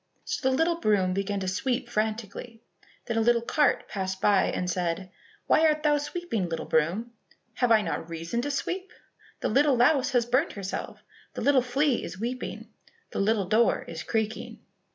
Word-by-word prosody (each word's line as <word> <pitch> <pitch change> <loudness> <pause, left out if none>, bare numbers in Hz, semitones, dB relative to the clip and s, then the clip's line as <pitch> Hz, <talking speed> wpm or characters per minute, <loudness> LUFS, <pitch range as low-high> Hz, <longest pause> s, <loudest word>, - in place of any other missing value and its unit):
So 265 - 0
the 260 - +1
little 335 +2 +1
broom 195 - +2
began 195 +1 -2
to 190 - -3
sweep 240 +7 -1
frantically. 220 +1 -3 0.4
Then 230 -2 -2
a - - +3
little 235 +1 +3
cart 290 +3 +2
passed 190 -1 -3
by 200 -1 +4
and 180 - -2
said, 180 +1 -2 0.3
"Why 320 +1 +4
art 305 0 +1
thou 295 -1 +3
sweeping, 290 - -3
little 165 - -3
broom?" 175 +10 0 0.4
"Have 245 +1 +1
I 220 -2 +5
not 165 -1 -4
reason 165 +8 -3
to 290 - -3
sweep?" 360 +6 -3 0.5
"The - - 0
little 285 -1 +4
louse 255 +2 +4
has 245 -2 +3
burnt 255 +7 +1
herself, 195 -2 -6 0.3
The - - -4
little 280 -2 +4
flea 260 +1 +1
is 190 - -7
weeping, 250 +3 -5 0.4
The - - -3
little 205 0 +2
door 220 +5 +2
is 165 -1 -6
creaking." 220 +1 -3
230 Hz, 175 wpm, -27 LUFS, 195-265 Hz, 0.5 s, I